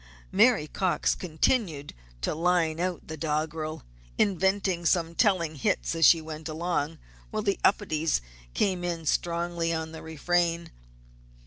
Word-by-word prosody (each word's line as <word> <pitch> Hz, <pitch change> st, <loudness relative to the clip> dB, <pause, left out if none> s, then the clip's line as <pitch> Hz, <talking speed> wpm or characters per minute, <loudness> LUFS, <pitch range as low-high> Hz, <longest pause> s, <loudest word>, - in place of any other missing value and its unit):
Mary 220 Hz, -4 st, +4 dB
Cox 185 Hz, +3 st, 0 dB
continued 160 Hz, -, -1 dB, 0.3 s
to -, -, -1 dB
line 165 Hz, -1 st, +1 dB
out 180 Hz, -1 st, -2 dB
the 160 Hz, -, -6 dB
doggerel, 155 Hz, +1 st, -2 dB, 0.3 s
inventing 190 Hz, -2 st, +1 dB
some 170 Hz, -1 st, +1 dB
telling 170 Hz, -6 st, +1 dB
hits -, -, 0 dB
as 165 Hz, -1 st, +5 dB
she 165 Hz, -, +7 dB
went 155 Hz, 0 st, -7 dB
along, 160 Hz, -1 st, -2 dB, 0.3 s
while 215 Hz, 0 st, -3 dB
the 200 Hz, -2 st, 0 dB
Upedes 165 Hz, -6 st, +2 dB, 0.4 s
came 185 Hz, -3 st, +1 dB
in 170 Hz, -2 st, -3 dB
strongly 170 Hz, +1 st, 0 dB
on 160 Hz, -1 st, -3 dB
the 160 Hz, -, -9 dB
refrain. 170 Hz, +2 st, 0 dB
170 Hz, 130 wpm, -27 LUFS, 160-180 Hz, 0.4 s, she